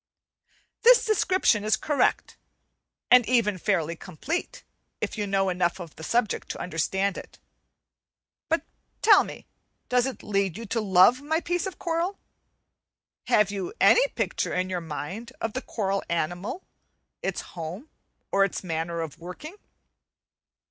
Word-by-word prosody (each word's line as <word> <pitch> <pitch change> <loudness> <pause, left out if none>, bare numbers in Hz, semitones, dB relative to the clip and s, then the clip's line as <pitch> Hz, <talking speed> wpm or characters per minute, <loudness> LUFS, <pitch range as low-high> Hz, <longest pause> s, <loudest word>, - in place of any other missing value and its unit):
This 485 +1 +7
description 370 - +2
is 215 +1 +2
correct, 290 -4 0 0.8
and 250 0 +8
even 215 -6 +2
fairly 170 -4 0
complete, 220 - -5 0.4
if - - -3
you 210 -2 -2
know 195 -1 +1
enough 180 0 0
of 170 -3 -9
the - - -12
subject 235 +3 0
to - - -5
understand 190 +3 -1
it. - - -13 1.1
But 325 -1 +1 0.4
tell 410 -3 +7
me, - - -9 0.4
does 250 0 +3
it 265 - -6
lead 195 -4 0
you 230 - -6
to 225 +2 -1
love 200 +6 +5
my 315 +3 0
piece 350 +2 -1
of 380 - -7
coral? 345 +3 -1 1.1
Have 210 -1 +3
you 200 - -4
any - - +6
picture - - -1
in 185 +1 -1
your 180 -1 -2
mind 185 - -6
of 225 -1 -3
the 260 - -3
coral 195 -5 -2
animal, 175 - -2 0.6
its - - -2
home, 175 - -6 0.4
or 195 - +4
its 195 - -2
manner 165 -1 -2
of 160 -4 -6
working? 180 - -9
205 Hz, 140 wpm, -26 LUFS, 180-270 Hz, 1.1 s, and